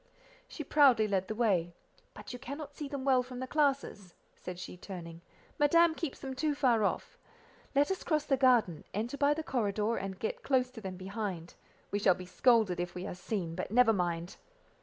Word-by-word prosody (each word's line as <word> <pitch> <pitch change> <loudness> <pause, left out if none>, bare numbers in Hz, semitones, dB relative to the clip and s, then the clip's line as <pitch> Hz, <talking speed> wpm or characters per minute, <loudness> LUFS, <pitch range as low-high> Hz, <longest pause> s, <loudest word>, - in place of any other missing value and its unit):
She 335 -10 -7
proudly 265 -7 +5
led 190 -2 0
the 215 - -4
way—"But 185 -2 -3
you 245 - -7
cannot 280 +3 -7
see 295 - -5
them 275 -1 -5
well 260 -2 +4
from 250 0 -9
the 260 - -3
classes," 270 - -1 0.2
said 180 -1 -8
she, 180 - -7
turning, 170 -3 -9 0.4
"Madame 335 +3 +5
keeps 320 -4 -4
them 265 -1 -6
too 295 +3 0
far 245 -6 +3
off. - - -2 0.6
Let 285 +5 +3
us 380 - -3
cross 305 -2 0
the 275 - +2
garden, 245 - +3
enter 230 +6 -2
by 285 +1 +3
the 320 - -4
corridor, 220 -4 0
and 195 -1 -4
get 220 - -3
close 255 -2 +1
to 225 - -10
them 190 -2 -6
behind: 190 -3 -5 0.4
we 205 - 0
shall 190 -3 +4
be 185 - -9
scolded 215 -2 +3
if 175 0 -3
we 180 +1 -5
are - - -4
seen, 180 -2 -4
but - - -4
never 230 +1 +5
mind." 175 -2 -2
230 Hz, 195 wpm, -31 LUFS, 185-275 Hz, 0.6 s, proudly